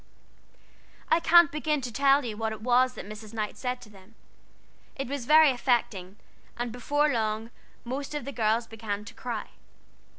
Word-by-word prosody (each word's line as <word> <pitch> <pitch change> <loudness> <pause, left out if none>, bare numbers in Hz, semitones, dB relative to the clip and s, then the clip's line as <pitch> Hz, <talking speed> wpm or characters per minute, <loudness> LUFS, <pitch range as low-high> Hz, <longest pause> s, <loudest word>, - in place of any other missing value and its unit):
I 325 - +5
can't 340 -1 +6
begin 305 0 0
to 245 -2 -6
tell 275 +2 +4
you 220 -3 -4
what 220 0 -2
it 215 - -9
was 250 +2 +3
that - - -8
Mrs. 215 +1 -10
Knight 215 -1 -3
said 250 -1 -3
to 210 - -13
them: 200 +2 -18 0.8
it 270 - -4
was 270 -2 -5
very 310 -1 +7
affecting, 230 -7 -1 0.4
and 240 0 -3
before 290 +5 +1
long 220 0 -2 0.3
most 275 +4 -5
of 295 - -4
the 280 - -4
girls 225 -1 +1
began 210 -2 -5
to 230 - -10
cry. 235 -3 -5
240 Hz, 170 wpm, -27 LUFS, 220-275 Hz, 0.8 s, very